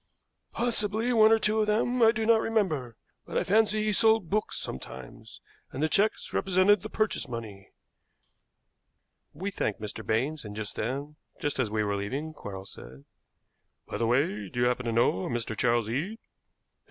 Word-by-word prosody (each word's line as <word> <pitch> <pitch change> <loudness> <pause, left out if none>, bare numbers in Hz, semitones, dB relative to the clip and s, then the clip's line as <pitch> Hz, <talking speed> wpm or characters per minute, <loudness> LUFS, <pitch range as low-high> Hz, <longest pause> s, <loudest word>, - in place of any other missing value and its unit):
"Possibly, 225 0 0
one 220 -1 +6
or 225 - +6
two 215 0 +1
of 215 - +2
them, 235 +4 +1
I 225 -1 +7
do 220 -1 -2
not 225 0 +5
remember; 155 - -1 0.3
but - - -3
I - - +2
fancy 215 +1 +3
he 215 -1 +1
sold 220 -4 +3
books 215 +1 -1
sometimes, 65 -1 -9 0.3
and 140 - -3
the - - +4
checks 205 +6 +1
represented 190 +1 +3
the - - -7
purchase 215 -1 -1
money." 110 -5 -7 1.6
We 190 +7 -4
thanked 105 - -2
Mr. 110 +1 -6
Baines, 135 +9 -1
and 105 -2 -8
then, 130 +7 -4 0.2
just 145 -2 -2
as 125 -5 +1
we 110 0 0
were 100 -1 -1
leaving, 140 +11 -4
Quarles 95 -8 -8
said: 65 +3 -13 0.8
"By - - -5
the 115 - +1
way, 110 -5 +1
do 120 - -3
you - - +4
happen 125 0 0
to - - 0
know 115 -5 +2
a - - -3
Mr. 120 -2 -3
Charles 120 -2 +2
Eade?" 160 - -2
145 Hz, 175 wpm, -28 LUFS, -, 1.6 s, I